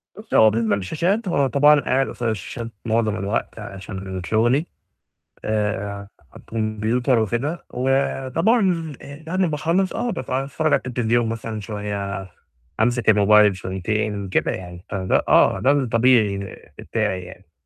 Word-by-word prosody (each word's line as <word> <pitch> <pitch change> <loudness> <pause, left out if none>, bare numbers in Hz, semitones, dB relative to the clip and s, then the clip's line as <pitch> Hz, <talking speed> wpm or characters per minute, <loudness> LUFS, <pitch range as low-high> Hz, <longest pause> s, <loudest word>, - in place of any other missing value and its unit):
بُصّي، 215 +2 -6
هو 110 0 +7
بالنسبة 110 -1 +1
للشاشات 170 - -1
هو 140 -6 +2
طبعًا 145 +2 +5
قاعد 135 0 +1
قصاد 120 -2 -3
الشاشات 115 +3 -5
معظم 110 -2 +1
الوقت 100 +2 -3
عشان 95 -1 -7
شغلي 120 +8 +2 0.8
آآ، 100 -2 -2 0.4
كمبيوتر 115 +3 0
وكده، 120 - -2
وطبعًا 160 - +1
آآ 140 +3 -11
يعني 185 +2 +1
باخلّص 165 +5 0
آه 245 - -2
با - - -4
باتفرّج 135 +4 -1
على - - +3
التلفزيون 120 -1 +1
مثلًا 115 -1 -4
شوية، 100 -2 -4 0.5
أمسِك 120 0 +1
الموبايل 105 -1 +5
شويتين، 100 +2 -3
كده 95 - +1
يعني، 90 0 -8
فده 95 -2 0
آه، - - +4
ده 135 - +3
الطبيعي 115 -6 +3 0.4
بتاعي 90 -1 -2
يعني. 90 -1 -13
115 Hz, 130 wpm, -22 LUFS, 100-140 Hz, 0.8 s, هو